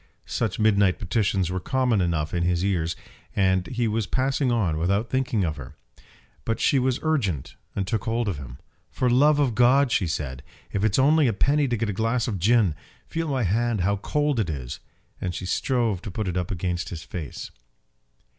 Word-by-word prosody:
Such 110 Hz, -5 st, -2 dB
midnight 100 Hz, -4 st, +3 dB
petitions 95 Hz, -2 st, 0 dB
were 95 Hz, -, -1 dB
common 125 Hz, 0 st, +1 dB
enough 80 Hz, -3 st, -1 dB
in 85 Hz, -, 0 dB
his 90 Hz, +1 st, +1 dB
ears, 85 Hz, -4 st, 0 dB, 0.4 s
and 95 Hz, -2 st, +2 dB
he 120 Hz, -2 st, -1 dB
was 110 Hz, -1 st, -1 dB
passing 135 Hz, 0 st, +1 dB
on 95 Hz, -10 st, +1 dB
without 100 Hz, +7 st, 0 dB
thinking 125 Hz, -6 st, +1 dB
of 80 Hz, -3 st, -2 dB
her. 70 Hz, +2 st, -9 dB, 0.7 s
But 115 Hz, 0 st, -2 dB
she 140 Hz, -, +3 dB
was 130 Hz, 0 st, +1 dB
urgent, 110 Hz, -, -1 dB, 0.2 s
and 100 Hz, -, -1 dB
took 110 Hz, +2 st, -2 dB
hold 115 Hz, 0 st, 0 dB
of 95 Hz, -7 st, -1 dB
him. 65 Hz, -2 st, -9 dB, 0.3 s
"For 125 Hz, -1 st, 0 dB
love 145 Hz, +4 st, +5 dB
of 140 Hz, -5 st, +2 dB
God," 125 Hz, +3 st, +4 dB
she 95 Hz, -, +2 dB
said, 65 Hz, -4 st, -3 dB, 0.3 s
"if 100 Hz, -, 0 dB
it's 110 Hz, -2 st, +2 dB
only 145 Hz, +2 st, +4 dB
a 115 Hz, -, +1 dB
penny 140 Hz, +8 st, +2 dB
to 120 Hz, -2 st, 0 dB
get 115 Hz, +1 st, -1 dB
a 105 Hz, -, -1 dB
glass 115 Hz, +4 st, 0 dB
of 105 Hz, -6 st, -2 dB
gin! 105 Hz, -2 st, +3 dB, 0.3 s
Feel 165 Hz, 0 st, -3 dB
my 135 Hz, -4 st, 0 dB
hand, 110 Hz, +2 st, +1 dB
how 100 Hz, +3 st, +1 dB
cold 145 Hz, +5 st, 0 dB
it 100 Hz, -6 st, 0 dB
is." 65 Hz, -5 st, -5 dB, 0.4 s
And 90 Hz, -2 st, -3 dB
she 90 Hz, -, -5 dB
strove 115 Hz, -2 st, 0 dB
to 105 Hz, -, -6 dB
put 105 Hz, +2 st, -3 dB
it 90 Hz, -, -2 dB
up 90 Hz, -1 st, -1 dB
against 90 Hz, -2 st, -2 dB
his 80 Hz, -2 st, -7 dB
face. 80 Hz, -6 st, -7 dB
105 Hz, 200 wpm, -25 LUFS, 90-125 Hz, 0.7 s, love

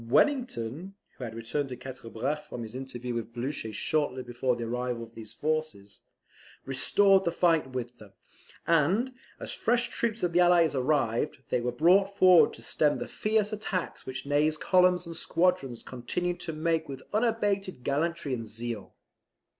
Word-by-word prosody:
Wellington 190 Hz, -, +1 dB, 0.2 s
(who 125 Hz, -, -6 dB
had 115 Hz, -1 st, -7 dB
returned 135 Hz, +5 st, -2 dB
to 125 Hz, -, -5 dB
Quatre 125 Hz, -2 st, -9 dB
Bras 145 Hz, +7 st, -3 dB
from 120 Hz, -, -5 dB
his 110 Hz, +1 st, -8 dB
interview 125 Hz, -2 st, -5 dB
with 115 Hz, -1 st, -4 dB
Blucher 120 Hz, -2 st, -3 dB
shortly 130 Hz, +3 st, -1 dB
before 125 Hz, +1 st, -1 dB
the 120 Hz, -, -5 dB
arrival 120 Hz, 0 st, -2 dB
of 115 Hz, 0 st, -12 dB
these 110 Hz, -2 st, -9 dB
forces) 150 Hz, -7 st, -3 dB, 0.6 s
restored 195 Hz, +9 st, +4 dB
the 170 Hz, -, 0 dB
fight 165 Hz, -5 st, +2 dB
with 125 Hz, -1 st, -5 dB
them; 105 Hz, -2 st, -14 dB, 0.5 s
and, 170 Hz, -, +2 dB, 0.3 s
as -, -, -6 dB
fresh 240 Hz, +1 st, +1 dB
troops 230 Hz, -2 st, -2 dB
of 175 Hz, -1 st, +1 dB
the 175 Hz, -, +4 dB
Allies 175 Hz, -3 st, +5 dB
arrived, 130 Hz, -2 st, 0 dB
they 125 Hz, -, +2 dB
were 125 Hz, +1 st, -1 dB
brought 180 Hz, +10 st, +4 dB
forward 185 Hz, -3 st, +6 dB
to -, -, -12 dB
stem 150 Hz, -1 st, +1 dB
the -, -, -5 dB
fierce 215 Hz, 0 st, 0 dB
attacks 205 Hz, -4 st, -4 dB
which 130 Hz, +1 st, -5 dB
Ney's 150 Hz, +2 st, +2 dB
columns 180 Hz, +1 st, +3 dB
and 165 Hz, 0 st, -7 dB
squadrons 165 Hz, -8 st, 0 dB
continued 175 Hz, +8 st, -3 dB
to 170 Hz, -, -4 dB
make 160 Hz, 0 st, -1 dB
with 135 Hz, -1 st, -7 dB
unabated 205 Hz, -, 0 dB
gallantry 150 Hz, +1 st, -1 dB
and 115 Hz, -3 st, -4 dB
zeal. 115 Hz, -1 st, -6 dB
145 Hz, 165 wpm, -28 LUFS, 120-180 Hz, 0.6 s, forward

